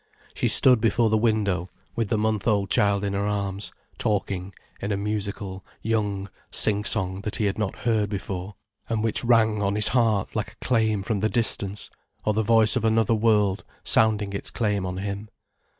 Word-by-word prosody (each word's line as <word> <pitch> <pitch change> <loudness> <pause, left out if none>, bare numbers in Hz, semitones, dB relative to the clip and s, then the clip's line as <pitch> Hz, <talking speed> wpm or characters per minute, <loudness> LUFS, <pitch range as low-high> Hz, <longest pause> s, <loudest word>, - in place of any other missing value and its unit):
She - - 0
stood 125 -4 +7
before 115 0 +2
the 110 - +4
window, 105 -6 0 0.3
with 115 -3 -1
the 110 - +1
month 110 -1 -1
old 100 -3 +1
child 100 0 +2
in 100 -1 -2
her 100 +1 -1
arms, 100 -1 -3 0.3
talking 95 -2 -2 0.3
in 100 - -3
a 100 - 0
musical, 100 -2 -4 0.2
young 105 -3 -1 0.2
sing 105 -1 +1
song 95 -4 -1
that 105 +1 -4
he 110 - -1
had 100 +1 -1
not 105 -3 -2
heard 110 -3 +1
before, 95 -1 -5 0.3
and 110 -2 -1
which 115 +1 +2
rang 110 -3 +3
on 100 0 0
his 105 +1 0
heart 115 -5 +1
like - - -3
a - - -9
claim 110 -5 +1
from 105 0 -1
the 110 +2 +1
distance, 105 -4 -2 0.3
or 105 - +2
the 110 - +1
voice 110 0 +4
of 125 - 0
another 110 0 +2
world 105 -3 +2 0.2
sounding 105 -2 +2
its 100 - -3
claim 105 -4 -1
on 90 0 -5
him. 100 +2 -5
105 Hz, 185 wpm, -25 LUFS, 100-110 Hz, 0.3 s, stood